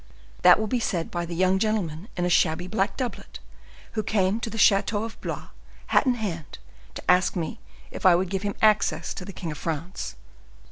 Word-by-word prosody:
That - - +7
will 220 - 0
be 245 +3 0
said 175 -7 -2
by 175 -1 -3
the 170 - -5
young 185 +2 +3
gentleman 195 -5 -1
in 180 - 0
a - - +2
shabby 175 -1 +2
black 195 +1 -1
doublet, 255 -3 -5 0.5
who 220 - -1
came 205 0 +1
to 230 - -4
the 225 - -6
chateau 205 +1 +3
of 225 0 -8
Blois, - - -5 0.4
hat - - +4
in 250 - +3
hand, 175 -10 -5 0.4
to - - -7
ask 180 +3 +4
me 175 +5 -3 0.3
if - - -8
I 185 -3 +7
would 180 +1 -1
give 195 -1 -1
him 205 -1 -3
access 215 -1 +3
to - - -7
the 195 - -7
king 170 -3 -5
of 150 - -7
France." 165 +2 -4
190 Hz, 205 wpm, -25 LUFS, 175-215 Hz, 0.5 s, That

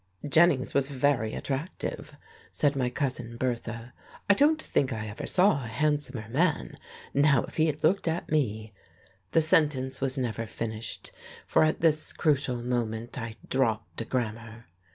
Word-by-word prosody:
"Jennings 155 -2 +4
was 140 -1 +3
very 135 -5 0
attractive," 140 +6 -5 0.4
said 145 -1 +1
my 125 -2 0
Cousin 125 -3 -3
Bertha. 120 -1 -3 0.3
"I 200 - +7
don't 300 +8 +3
think 140 - 0
I 110 -2 -3
ever 105 - -6
saw 185 -7 +3
a - - -5
handsomer 145 -2 -1
man. 155 +7 0 0.3
Now, 140 -3 +4
if - - -10
he 160 0 +4
had 150 -1 -3
looked 175 +4 +2
at 165 +2 -2
me 110 -7 -1 0.3
" 95 0 -33
The 165 - +5
sentence 145 -5 +3
was 135 0 +1
never 115 -3 -2
finished, 110 0 -5 0.3
for - - +3
at 155 0 +1
this 155 -2 +2
crucial 135 -6 0
moment 120 -1 -2
I 115 -1 -6
dropped 115 -4 -1
a - - -4
grammar.... 115 -1 -4
130 Hz, 155 wpm, -28 LUFS, 115-150 Hz, 0.4 s, I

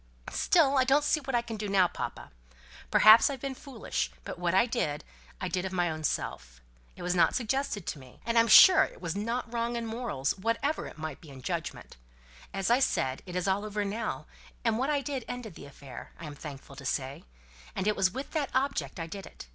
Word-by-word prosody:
"Still, 280 -6 +3
I - - +5
don't 275 +3 +3
see 305 +1 +2
what 270 -3 -3
I 235 - +2
can 230 -2 -6
do 210 0 -4
now, 190 -2 +4
papa. - - -6 0.6
Perhaps 215 +4 +8
I've 275 -2 -4
been 275 +1 -4
foolish; 235 - -4
but - - -7
what 175 0 0
I 210 - +5
did, 150 -10 -2 0.4
I 185 - -2
did 180 0 -1
of 190 - -3
my 175 -3 +1
own 155 0 -6
self. - - -3 0.4
It - - -9
was 180 0 0
not 175 - +3
suggested 240 -5 -1
to 150 - -4
me. 130 -2 -15
And 230 - -1
I'm 230 0 +5
sure 370 - +9
it - - -6
was 170 -1 -4
not 230 +3 -3
wrong 235 0 -1
in 235 -1 -2
morals, 225 - -2
whatever 230 +9 -1
it - - -11
might 155 -3 -6
be 160 - -13
in 130 -2 -11
judgment. - - -5 0.5
As 195 +3 -1
I 245 - +5
said, 130 - 0
it's 180 0 -2
all 195 +2 +1
over 210 -1 -2
now; 215 +2 -3 0.4
what 235 +5 +1
I 290 -2 +1
did 270 -2 -4
ended 245 -6 -6
the - - -11
affair, 135 -2 -11
I 170 - -7
am 150 - -7
thankful 140 -2 -10
to 140 - -9
say; 135 +1 -2 0.5
and 190 - -2
it 210 - +2
was 190 -1 +3
with 265 +8 -6
that 300 -3 -1
object 260 - -1
I 165 - -3
did 195 +4 -8
it. - - -11
210 Hz, 220 wpm, -29 LUFS, 165-245 Hz, 0.6 s, sure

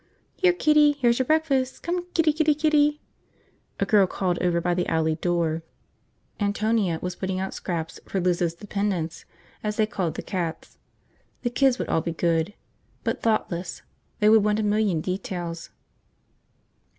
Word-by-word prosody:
"Here, 370 -1 +4
kitty, 300 -4 +4
here's 240 -4 +2
your 260 - 0
breakfast, 280 -5 +1
come 350 +1 -2
kitty 315 -2 +4
kitty 310 -1 +2
kitty!" 300 -1 +2 0.8
a - - +2
girl 205 -4 +4
called 180 -1 -1
over 175 -1 +1
by 175 +1 0
the 180 0 -1
alley 160 -1 +1
door. 165 -1 0 0.8
Antonia 205 -3 +1
was 180 0 -2
putting 190 0 -3
out 190 0 -3
scraps 165 -2 -4
for 195 - -1
Liz's 175 -2 +1
dependents, 195 -4 -3 0.4
as 210 0 -1
they 215 - +4
called 190 -6 -3
the - - -5
cats. 170 -4 -4 0.6
The 240 - 0
kids 265 0 +3
would - - -3
all 160 - +2
be 170 0 -3
good. 165 +3 0 0.5
But - - -2
thoughtless. 185 -6 -1 0.4
They 210 - +3
would 220 -1 +6
want 210 0 +1
a - - 0
million 205 -5 +1
details. 175 -2 -4
200 Hz, 155 wpm, -25 LUFS, 175-255 Hz, 0.8 s, would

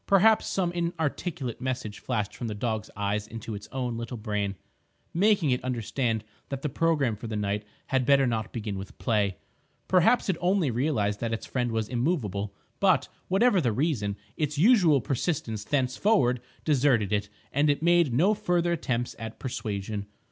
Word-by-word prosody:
Perhaps 210 +3 +5
some 180 -3 0
inarticulate 170 -6 -2
message 125 -5 -3
flashed 105 -5 -2
from 120 - -4
the 105 - -3
dog's 110 0 -2
eyes 105 +1 -1
into 115 0 -6
its 105 0 -8
own 125 -3 -2
little 115 +1 -5
brain, 105 -2 -2 0.6
making 190 -5 +3
it 125 - 0
understand 120 -2 -1 0.3
that 135 -1 -4
the 150 - 0
programme 145 -5 +1
for 110 +3 -7
the 110 - -4
night 105 0 -1 0.2
had 130 -1 +1
better 140 +1 +5
not 110 -3 -1
begin 105 -4 -4
with 95 - -9
play. 100 -4 +1 0.5
Perhaps 190 +7 +4
it 190 -4 +1
only 180 -5 +2
realised 110 -5 0
that 115 -1 -2
its 110 - -3
friend 125 -2 -1
was 110 -1 -1
immovable. 120 - -1 0.3
But, - - +3 0.2
whatever 195 0 +4
the 120 -6 +1
reason, 105 -7 0 0.2
its 150 -1 -1
usual 175 - +5
persistence 120 - -2
thenceforward 130 - +2 0.2
deserted 125 -8 +3
it, 105 0 0 0.2
and 145 +2 +3
it 145 +2 +1
made 170 -4 +4
no 170 - +4
further 175 -5 +1
attempts 125 -7 -1
at 110 -1 -6
persuasion. 105 -4 -4
125 Hz, 165 wpm, -27 LUFS, 110-160 Hz, 0.6 s, Perhaps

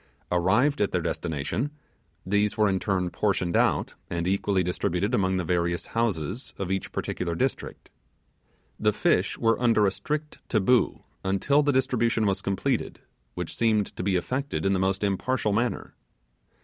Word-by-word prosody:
Arrived 105 +12 +2
at 105 - +2
their 90 - +1
destination, 80 - -2 0.6
these 105 +2 +1
were 105 -1 +4
in 95 -1 +1
turn 90 -1 -1
portioned 95 -4 0
out, - - +2 0.2
and 85 0 -2
equally 95 0 +1
distributed 90 +4 -1
among 95 -5 +2
the 90 - -1
various 85 0 0
houses 110 - -2
of 95 -2 -3
each 95 - -2
particular 85 -2 -3
district. - - -3 0.9
The - - +2
fish - - +1
were 115 +1 +2
under 115 -4 +4
a 95 - +3
strict 150 +7 -4
Taboo, 115 +3 +2 0.2
until 100 +10 +2
the 145 0 +2
distribution 120 -4 +1
was 100 -2 +1
completed, 115 +6 -1 0.3
which 90 -2 -5
seemed 110 -3 +1
to - - -4
be 95 0 +1
effected 130 +10 -2
in 95 - +3
the 95 - +1
most 95 +1 0
impartial 105 +3 0
manner. 120 +3 -1
100 Hz, 155 wpm, -26 LUFS, 90-115 Hz, 0.9 s, were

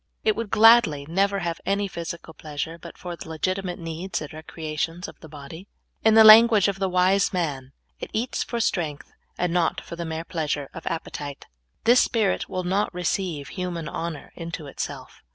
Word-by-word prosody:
It 215 - +3
w^ould 230 -2 -4
gladly 215 -11 +6
never 195 +4 +1
have 170 -1 -3
any 200 +1 0
physical 170 -2 -7
pleasure 155 +2 -5
but - - -11
for 175 -1 -6
the 160 - -10
legitimate 185 +3 -2
needs 170 +2 -4
and 150 - -8
recreations 160 +2 -4
of - - -13
the 160 - -12
body. 155 +5 -10 0.4
In 220 0 +5
the 220 - +9
language 220 -1 +9
of 195 -1 -2
the 190 -1 0
w4se 185 +2 +3
man, 140 -7 -2
' - - -48
' - - -46
It - - -6
eats 235 +3 -2
for 235 - -3
strength, 160 -9 -2 0.3
and 180 -1 0
not 175 -2 +1
for - - -9
the 170 - -4
mere 160 0 -4
pleasure 150 -5 -3
of - - -9
appetite." 145 -3 -5 0.4
This 240 +2 +6
spirit 220 -4 0
will 185 - -3
not 195 +4 0
receive 175 -4 -2
human 175 -4 -4
honor 165 -3 -5
into 165 -2 -6
it 140 - -12
self. - - -6
175 Hz, 190 wpm, -25 LUFS, 160-195 Hz, 0.4 s, the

